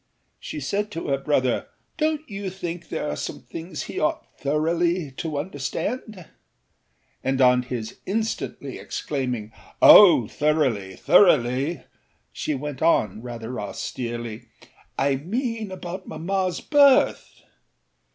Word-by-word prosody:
She 150 - -6
said 200 +9 -2
to 165 - -4
her 135 -1 +1
brother: 130 -3 0 0.3
âDonât 310 0 0
you 200 -2 -5
think 175 -2 -6
there - - -3
are - - -2
some - - -6
things 165 0 -7
he - - -5
ought 155 - 0
thoroughly 165 +2 0
to 155 -3 -3
understand?â 185 - -4 1.0
and 135 0 0
on 125 -1 +5
his 120 -3 -6
instantly 220 +3 -3
exclaiming 125 -7 -3 0.3
âOh, 185 - +9
thoroughlyâthoroughly!â 135 - +2 0.5
she 150 - -2
went 140 0 -6
on, 110 - +2
rather 120 0 -6
austerely: 120 +2 -5 0.5
âI 140 0 +1
mean 225 - -3
about 185 0 -7
mammaâs 185 +3 -2
birth. 285 -3 +4
150 Hz, 110 wpm, -24 LUFS, 125-185 Hz, 1.0 s, âOh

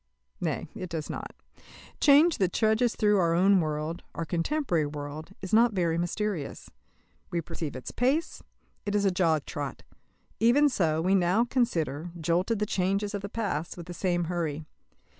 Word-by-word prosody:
Nay, - - -2
it 185 - -6
does 160 -3 -4
not. - - -6 0.7
Change 300 +3 +5
that 185 -3 +1
trudges 220 +2 +2
through 210 -2 +3
our 170 -2 +2
own 190 +2 +5
world 155 +1 -2
our 165 - -3
contemporary 170 - 0
world 150 +4 -7
is 190 - -5
not 230 +1 +5
very 170 -4 +1
mysterious. 175 -3 -3 0.6
We 170 - -1
perceive 165 -3 -5
its 130 - -6
pace; 275 +7 0 0.4
it 205 0 -2
is 205 -1 +2
a 195 - +4
jog 165 -5 +1
trot. 145 -2 -5 0.6
Even 270 +6 +5
so, 160 - +1
we 185 +2 +2
now 190 +5 +3
consider, 175 - -1
jolted 175 +7 +1
the 210 - 0
changes 195 +2 0
of 205 - -3
the 200 - -6
past, 190 -8 -3
with 170 - -7
the 175 - -7
same 175 -1 0
hurry. 160 -3 -3
180 Hz, 165 wpm, -28 LUFS, 165-210 Hz, 0.7 s, Change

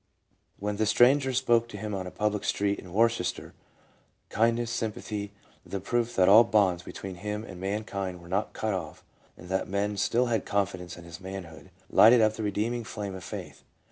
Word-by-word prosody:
When 105 0 -3
the 110 0 +1
stranger 130 +6 +4
spoke 120 -2 +2
to 105 - -9
him 105 +1 -5
on 95 -2 -3
a - - -4
public 105 +1 -1
street 100 0 0
in 90 - -11
"Worcester, 115 -2 0 0.8
kindness, 115 +1 +1
sympathy, 105 -2 -4 0.3
the 100 - -5
proof 120 +4 -1
that 90 -1 +4
all 110 +4 +9
bonds 95 -6 +2
between 95 +1 -8
him 105 +3 -4
and 95 -5 -10
mankind 100 -2 -3
were 85 - -14
not 95 +4 -1
cut 110 -1 -2
off, 95 - -6 0.3
and - - -12
that 95 0 -1
men 100 +2 -1
still 115 +5 +2
had 115 -4 0
confidence 95 -3 -2
in 85 - -11
his 85 0 -10
manhood, 90 -5 -8 0.2
lighted 115 +3 +7
up 110 -1 +4
the 110 - -6
redeeming 110 +3 -1
flame 100 -1 -5
of 95 -1 -8
Faith. 90 - -8
105 Hz, 185 wpm, -28 LUFS, 95-115 Hz, 0.8 s, all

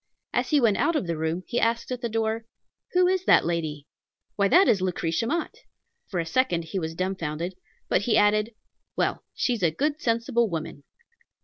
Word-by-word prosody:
As - - 0
he 300 - +4
went 225 -6 +3
out 335 - +1
of 300 - 0
the 170 -1 -2
room, 160 +3 -2
he 240 - -1
asked 230 +2 0
at 250 -1 -3
the 235 - -2
door, 225 0 -1 0.5
"Who 360 0 +5
is 370 0 +1
that - - +5
lady?" 160 -4 -2 0.5
"Why, 200 -1 +3
that 370 - +5
is 195 - +3
Lucretia 180 +2 -1
Mott!" 330 +5 -1 0.5
For 180 - -3
a 165 - -1
second 175 -3 +1
he 190 +4 -3
was 160 -1 -4
dumbfounded; 175 -2 -3 0.3
but - - +2
he 220 +2 +2
added, 210 +2 +2 0.4
"Well, - - -1
she's 240 -5 0
a 170 - +4
good, 290 - -1
sensible 230 0 +1
woman." 160 -4 -5
210 Hz, 190 wpm, -26 LUFS, 170-235 Hz, 0.5 s, Who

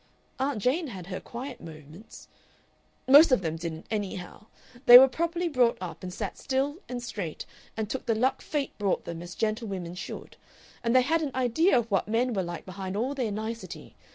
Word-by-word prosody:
Aunt 270 -1 0
Jane 285 - +1
had 190 -8 -8
her 185 0 -5
quiet 245 +1 -8
moments. 160 +5 -12 0.8
Most 285 +3 +8
of 250 -7 +3
them 160 -1 -2
didn't, 165 -1 -6
anyhow. 205 -1 -5 0.4
They 245 - +13
were 265 +1 +9
properly 335 +5 -1
brought 255 -7 +2
up, 180 -2 -7
and 185 - -6
sat 200 +2 -5
still 275 +3 -1
and 245 -1 -4
straight, 195 -9 -5 0.3
and 220 -1 -2
took 260 +4 -5
the 225 - +2
luck 255 +4 +1
fate 290 -3 -3
brought 200 -2 0
them 170 -1 -6
as 175 0 -9
gentlewomen 210 -6 -2
should. 180 - -8 0.5
And 230 +1 +1
they 255 - +6
had 320 +5 +1
an 300 - -1
idea 260 +7 +3
of 230 -2 -1
what 195 0 +1
men 235 +3 +1
were 195 - 0
like 175 -1 -6
behind 190 +1 -5
all 250 +6 -1
their 250 -6 -2
nicety. 220 +2 -6
225 Hz, 190 wpm, -28 LUFS, 185-260 Hz, 0.8 s, They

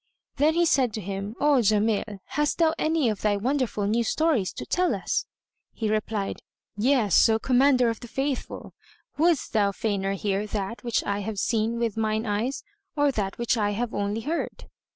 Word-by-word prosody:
Then 305 +3 +3
he 345 0 +3
said 260 -8 +2
to - - -3
him, 200 +2 -5
"O 290 -2 +4
Jamil, 210 -1 +1
hast 295 +2 0
thou 325 -2 +3
any 315 -4 +1
of 215 - -3
thy 205 -1 +2
wonderful 250 -2 -1
new 225 +3 +1
stories 275 - +1
to - - -7
tell 360 0 +1
us?" - - -2 0.5
He 220 -2 -2
replied, 215 -2 -2 0.3
"Yes, 225 -2 +4
O 220 - +3
Commander 255 +1 +3
of 230 -1 -1
the 240 - -9
Faithful: 270 +2 -4 0.5
wouldst 330 -3 +2
thou 205 -3 +3
fainer 195 -1 -1
hear 200 +1 -1
that 210 +2 -4
which 235 -2 0
I 200 0 -2
have 210 +1 -4
seen 225 +3 0
with 230 -2 -1
mine 220 0 0
eyes 220 +6 -2 0.3
or 290 -1 +3
that 200 -6 -3
which 235 0 0
I 205 -1 +1
have 235 +2 -3
only 205 +2 -2
heard?" 315 +8 -4
225 Hz, 180 wpm, -26 LUFS, 205-270 Hz, 0.5 s, O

